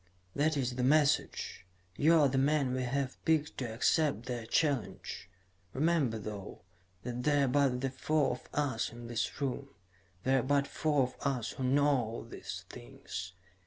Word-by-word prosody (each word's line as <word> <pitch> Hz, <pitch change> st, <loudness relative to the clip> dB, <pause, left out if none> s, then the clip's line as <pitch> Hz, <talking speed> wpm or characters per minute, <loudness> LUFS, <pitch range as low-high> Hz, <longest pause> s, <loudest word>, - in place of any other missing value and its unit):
"That 150 Hz, +1 st, +2 dB
is 125 Hz, -2 st, -1 dB
the 125 Hz, -, 0 dB
message. 145 Hz, -7 st, +2 dB, 0.3 s
You 160 Hz, +8 st, +5 dB
are 145 Hz, -, +6 dB
the 135 Hz, 0 st, +1 dB
man 140 Hz, -2 st, +2 dB
we 130 Hz, -, -1 dB
have 130 Hz, +1 st, -2 dB
picked 155 Hz, -2 st, +1 dB
to 125 Hz, -4 st, -3 dB
accept 130 Hz, +1 st, +1 dB
their 120 Hz, -3 st, -4 dB
challenge. 140 Hz, -, -1 dB, 0.4 s
Remember, 145 Hz, -5 st, +2 dB
though, 105 Hz, -2 st, -7 dB, 0.4 s
that 125 Hz, 0 st, -4 dB
there 145 Hz, +1 st, +3 dB
are -, -, 0 dB
but 130 Hz, -1 st, +2 dB
the 135 Hz, -1 st, -1 dB
four 145 Hz, +1 st, +1 dB
of 125 Hz, -, -7 dB
us 135 Hz, -6 st, -1 dB
in 120 Hz, 0 st, -10 dB
this 115 Hz, -1 st, -2 dB
room. 140 Hz, 0 st, -2 dB, 0.5 s
There 135 Hz, +1 st, +3 dB
are -, -, +1 dB
but 140 Hz, +2 st, +2 dB
four 145 Hz, -1 st, +1 dB
of 125 Hz, -, -4 dB
us 130 Hz, -5 st, -1 dB
who 130 Hz, -, -5 dB
know 130 Hz, -4 st, +2 dB
these -, -, -7 dB
things. 90 Hz, +9 st, -8 dB
135 Hz, 165 wpm, -32 LUFS, 120-145 Hz, 0.5 s, are